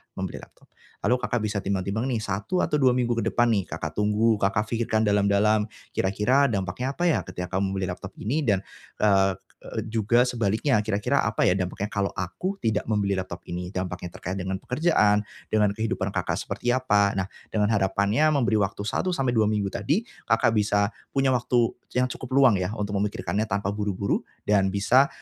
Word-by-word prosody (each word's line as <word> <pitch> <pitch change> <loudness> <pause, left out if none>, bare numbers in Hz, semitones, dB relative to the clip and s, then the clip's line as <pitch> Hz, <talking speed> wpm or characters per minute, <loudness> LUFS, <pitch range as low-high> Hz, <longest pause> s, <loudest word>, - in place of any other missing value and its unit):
membeli - - -4
laptop, - - -18 0.3
lalu 125 - +3
Kakak 120 -2 -1
bisa 105 -1 -1
timbang-timbang 100 +4 -2
nih 115 -5 -1
1 105 - -1
atau 150 - +1
2 130 -3 +4
minggu 120 -2 +1
ke - - -1
depan 120 -1 +2
nih 100 -4 0
Kakak - - -5
tunggu, 105 +1 +2
Kakak 100 +2 +1
pikirkan 115 -1 +1
dalam-dalam, 105 +1 +3 0.2
kira-kira 105 +9 +2
dampaknya 115 +5 -2
apa 175 - -2
ya 170 -3 +3
ketika 90 0 -6
kamu 95 0 -1
membeli 95 -1 -2
laptop 95 +2 -8
ini 140 +6 -2
dan, 100 -2 +2 0.4
eee 95 -2 +4 0.3
eee, 110 - -4
juga 115 +2 +2
sebaliknya, 115 +2 +1
"Kira-kira 105 -1 +1
apa - - -1
ya 90 - +4
dampaknya 95 +2 -2
kalau 100 -2 -1
aku 100 - -3
tidak 110 -2 0
membeli 100 -2 +1
laptop 95 -2 -5
ini?" 90 +1 -4
Dampaknya 90 -1 -4
terkait 95 +2 -5
dengan 95 0 -3
pekerjaan, 115 -8 +2 0.3
dengan 105 -2 +3
kehidupan 110 -2 -2
Kakak - - -1
seperti 120 - -3
apa. 105 -6 +2
Nah, 95 - 0 0.2
dengan 105 0 +1
harapannya 100 +8 +2
memberi 120 -5 +2
waktu 100 +1 -2
1-2 125 - +1
minggu 105 -2 0
tadi, 170 +11 0 0.3
Kakak 115 0 +4
bisa 105 -1 +2 0.2
punya 135 -1 +3
waktu 120 -1 +2 0.3
yang 125 - +4
cukup 125 - -7
luang 125 -8 +5
ya 90 +4 -2
untuk 105 -1 -3
memikirkannya 105 +1 -1
tanpa 100 -1 -1
buru-buru 100 -1 -1 0.2
dan 100 -2 +3
bisa, 120 +8 +4
105 Hz, 175 wpm, -25 LUFS, 100-120 Hz, 0.4 s, luang